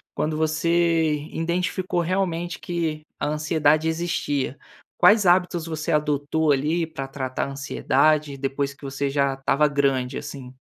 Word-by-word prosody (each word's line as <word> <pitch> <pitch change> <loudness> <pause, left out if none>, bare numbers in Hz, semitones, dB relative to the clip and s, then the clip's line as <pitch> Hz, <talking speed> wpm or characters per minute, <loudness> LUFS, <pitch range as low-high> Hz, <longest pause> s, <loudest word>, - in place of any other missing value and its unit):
quando 155 0 -1
você 160 0 +2 0.2
identificou 175 +2 -1
realmente 175 -1 -1
que 160 -3 -3 0.2
a - - -1
ansiedade 155 0 +2
existia. 160 -5 -1 0.4
Quais 210 -2 +6
hábitos 175 -2 +3
você 160 -2 -3
adotou, 150 0 +1
ali, 155 +4 +1
para 135 -4 -6
tratar 130 -1 -3
a - - -6
ansiedade 145 +1 +1
depois 140 +1 -2
que 140 - -23
você 140 +1 -2
já 140 -1 +1
estava 140 +2 +2
grande, 135 -3 0
assim? 135 -3 -8
155 Hz, 135 wpm, -24 LUFS, 140-165 Hz, 0.4 s, Quais